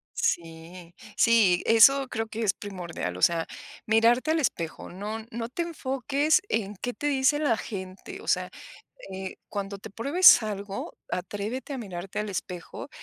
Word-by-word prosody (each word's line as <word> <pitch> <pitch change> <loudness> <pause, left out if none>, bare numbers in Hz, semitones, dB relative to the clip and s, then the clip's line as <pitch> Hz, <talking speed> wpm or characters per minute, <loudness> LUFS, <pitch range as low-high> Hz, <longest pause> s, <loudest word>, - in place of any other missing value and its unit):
Sí 170 +1 -3 0.2
sí, 215 -7 +4
eso 265 +4 +6
creo 225 -2 -3
que 220 +1 -4
es 195 - +2
primordial, 175 - -6
o - - -9
sea, 165 -1 +3 0.4
mirarte 235 +7 +3
al 325 - +2
espejo, 170 - -2
no 210 +4 -6
no 230 +1 -4
te 340 - -2
enfoques 290 +1 0
en 210 -2 -1
qué 245 +6 -4
te 290 - -3
dice 275 +1 +2
la 265 -7 +2
gente. 195 - -7
O - - -13
sea, - - +1 0.6
eh, 190 0 -6
cuando 200 -1 -4
te 210 - -10
pruebes 280 - +6
algo, 200 -2 -5
atrévete 210 +9 -4
a - - -5
mirarte 190 -3 -6
al 210 -1 -4
espejo 180 +6 -6
220 Hz, 155 wpm, -27 LUFS, 190-260 Hz, 0.6 s, eso